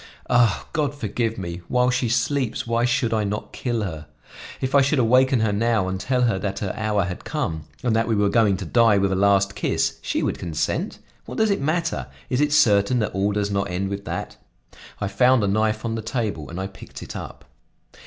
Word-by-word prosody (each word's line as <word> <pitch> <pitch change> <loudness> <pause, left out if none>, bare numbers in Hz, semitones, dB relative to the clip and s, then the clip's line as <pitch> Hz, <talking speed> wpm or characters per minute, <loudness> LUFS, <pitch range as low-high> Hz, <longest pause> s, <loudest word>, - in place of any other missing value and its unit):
Ah! 120 -4 +3
God 145 -3 0
forgive 115 -2 -2
me! 85 -2 -5
While 125 0 +2
she 125 -1 0
sleeps 125 +1 0
why 115 +1 +1
should 120 -2 +1
I 110 -1 +1
not 105 +1 -4
kill 120 -3 -2
her? 80 -5 -6 0.5
If 130 0 -2
I 140 - +6
should 140 +2 +2
awaken 130 +1 +4
her 110 -2 +1
now 110 -2 +1
and 95 0 -3
tell 125 +3 0
her 115 -6 +2
that 100 0 -3
her 100 -3 -3
hour 105 -2 0
had 90 0 -5
come 80 -2 -3 0.2
and 120 -3 +1
that 115 0 +1
we 115 - +1
were 100 0 +2
going 100 -2 +3
to 95 - -6
die 115 +3 +4
with 100 0 +1
a - - +1
last 100 0 +3
kiss, 100 - -1
she - - -1
would - - -1
consent. 80 -3 -2 0.3
What - - -7
does 220 -1 +3
it 200 - 0
matter? 155 - -1 0.2
Is 125 +2 +2
it 150 0 +2
certain 105 -4 +4
that 110 -3 -1
all 100 +1 +1
does 100 0 -1
not 100 0 -1
end 95 +2 -2
with 100 0 -5
that?" - - -5 0.6
I 100 - -1
found 125 +4 +3
a - - +2
knife 110 +2 0
on 115 - -1
the 115 - -3
table 110 - -3
and 85 - -6
I 95 - -2
picked 95 -2 -10
it - - -9
up. - - -8
110 Hz, 225 wpm, -23 LUFS, 100-125 Hz, 0.6 s, I